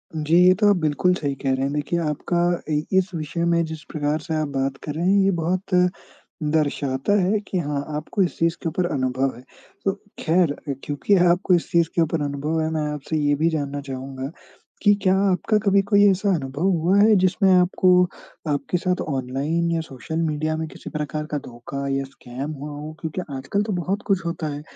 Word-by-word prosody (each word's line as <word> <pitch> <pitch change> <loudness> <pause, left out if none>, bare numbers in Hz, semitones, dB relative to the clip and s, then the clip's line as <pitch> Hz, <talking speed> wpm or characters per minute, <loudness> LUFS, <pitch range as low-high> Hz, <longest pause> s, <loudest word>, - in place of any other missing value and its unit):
जी। 155 +2 +1
ये 185 - +7
तो 210 -1 +5
आप 200 - +5
बिल्कुल 155 +4 +2
सही 145 -6 -2
कह 135 -1 -1
रहे 130 - -1
हैं। 140 +1 -1
देखिए 150 +4 -1
आपका 155 +2 -1 0.4
इ 150 - +2 0.2
इस 190 0 +2
विषय 160 +2 -3
में 170 0 +3
जिस 160 -1 -7
प्रकार 150 0 -1
से 160 +1 -5
आप 150 - -1
बात 135 -1 -2
कर 150 - -4
रहे 170 +2 -1
हैं, 200 +2 +4
ये 195 - +3
बहुत 180 +3 -2 0.7
दर्शाता 145 +1 0
है 200 +4 +2
कि 185 - -2
हाँ, 145 -2 -2
आपको 155 +6 -2
इस 175 - -3
चीज़ 165 +1 +2
के 165 - 0
ऊपर 175 +3 -1
अनुभव 130 -1 0
है। 125 - -13 0.4
तो 195 - +2 0.3
ख़ैर 170 -1 +3 0.2
अ, 140 - 0
क्योंकि 145 +8 +1 0.2
आपको 180 +1 +2
इस 170 - -2
चीज़ 170 -1 +3
के 170 - +3
ऊपर 160 -1 0
अनुभव 145 +3 -1
है, 160 - 0
मैं 155 -1 -1
आपसे 150 +2 -3
ये 145 -1 +2
भी 160 +3 +2
जानना 145 -2 -3
चाहूँगा 135 +1 -6 0.5
कि 205 -1 +6
क्या 190 0 +4 0.2
आपका 210 +4 +1
कभी 200 0 +5
कोई 205 0 +6
ऐसा 200 +2 0
अनुभव 140 +2 -4
हुआ 180 +2 +2
है 215 +1 +6
जिसमें 190 +1 +3
आपको 180 0 +4 0.6
आपके 150 +4 0
साथ 180 +1 -1
ऑनलाइन 140 +5 -1
या 165 - +1
सोशल 160 +2 -6
मीडिया 155 0 -1
में 160 0 -3
किसी - - -10
प्रकार 150 0 -3
का 150 - 0
धोखा 135 +3 -6
या 135 0 0
स्कैम 135 +2 -7
हुआ 145 0 -7
हो, 150 +2 -7
क्योंकि 160 +3 -3
आजकल 135 +10 -1
तो 210 -2 -2
बहुत 185 +3 -1
कुछ 190 -4 +1
होता 170 -2 -3
है? 145 - -6
155 Hz, 210 wpm, -23 LUFS, 145-180 Hz, 0.7 s, ये